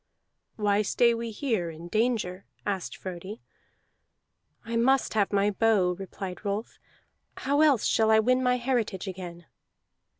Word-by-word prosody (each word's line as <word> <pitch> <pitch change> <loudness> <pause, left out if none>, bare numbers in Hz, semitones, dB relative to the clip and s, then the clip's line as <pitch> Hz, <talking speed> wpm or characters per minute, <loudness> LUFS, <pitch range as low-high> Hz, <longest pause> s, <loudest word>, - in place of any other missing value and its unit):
"Why 205 -1 +2
stay 235 +3 +3
we 230 0 -3
here 220 -6 -1
in 165 +1 -9
danger?" 215 -3 -1 0.2
asked 195 -3 -3
Frodi. 185 +4 -7 1.3
"I 230 0 -4
must 265 +4 +2
have 205 -3 +1
my 200 0 +2
bow," 205 -3 +3
replied 190 0 -7
Rolf. 205 +2 -4 0.6
"How 285 +3 +1
else 285 -8 +4
shall 220 -1 +3
I 220 - +6
win 255 +4 +3
my 250 -1 +2
heritage 235 -6 -1
again?" 175 -2 -7
210 Hz, 135 wpm, -27 LUFS, 190-235 Hz, 1.3 s, I